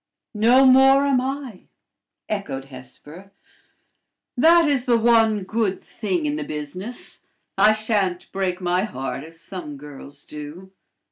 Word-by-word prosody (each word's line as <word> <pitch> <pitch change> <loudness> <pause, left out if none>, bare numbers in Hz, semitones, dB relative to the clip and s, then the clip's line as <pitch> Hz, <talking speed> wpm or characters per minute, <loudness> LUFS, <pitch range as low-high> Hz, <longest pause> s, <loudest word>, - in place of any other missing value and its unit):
"No 235 +5 +5
more 270 +1 +6
am 270 -3 +2
I," 265 -6 -6 0.6
echoed 140 -11 -5
Hesper; 145 +8 -12 1.0
"that 330 +5 +5
is 275 -4 0
the 240 -2 +3
one 225 -3 +3
good 210 -1 -1
thing 185 -7 -3
in 150 0 -1
the 150 - -3
business: 155 +11 -6 0.4
I 215 - +5
sha'n't 205 -5 -2
break 190 -2 -2
my 180 0 0
heart, 135 - -5
as 165 +1 -11
some 165 -5 -8
girls 145 0 -12
do. 150 +6 -10
195 Hz, 130 wpm, -22 LUFS, 150-235 Hz, 1.0 s, more